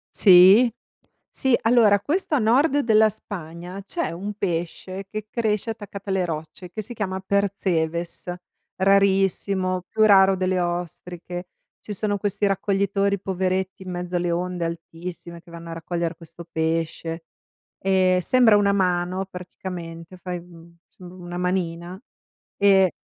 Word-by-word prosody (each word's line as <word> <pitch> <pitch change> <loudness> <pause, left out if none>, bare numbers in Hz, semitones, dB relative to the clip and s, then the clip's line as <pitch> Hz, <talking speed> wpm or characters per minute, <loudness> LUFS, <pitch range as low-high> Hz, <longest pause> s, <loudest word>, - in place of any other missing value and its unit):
Sì, 195 +5 +7 0.6
sì, 265 -3 +1
allora 225 -3 +5
questo 310 - -1
a - - +4
nord 260 +6 +3
della 220 -4 +4
Spagna, 180 -3 -8
c'è 335 - -3
un 200 +5 -5
pesce 185 +1 -4
che 215 0 -5
cresce 220 -1 -1
attaccato 205 -2 -8
alle 190 -1 +1
rocce 160 +2 -6
che 215 +4 -6
si 240 +4 -8
chiama 190 -4 -3
Percebes, 180 -4 -1 0.4
rarissimo, 195 -1 +2
più 220 - +2
raro 195 -2 +6
delle 185 0 0
ostriche. 175 +1 -4 0.3
Ci 210 - -7
sono 205 +1 -1
questi 205 0 -1
raccoglitori 200 0 +1
poveretti 190 0 -2
in 185 - -8
mezzo 180 0 -3
alle 175 0 -1
onde 175 0 -2
altissime 170 +1 -7
che 175 - -20
vanno 170 0 -9
a - - -4
raccogliere 170 0 -3
questo 170 +1 -12
pesce. 165 0 -2 0.6
Ehm 185 -1 +3
sembra 230 +3 +4
una 200 -1 +3
mano 185 0 0
praticamente, 180 -2 -8
fai, 180 0 -5
uhm, 170 -1 -16
insomma 180 0 -13
una 175 -1 -7
manina 180 0 -2 0.6
e 195 -2 +5
185 Hz, 135 wpm, -23 LUFS, 175-200 Hz, 0.6 s, Sì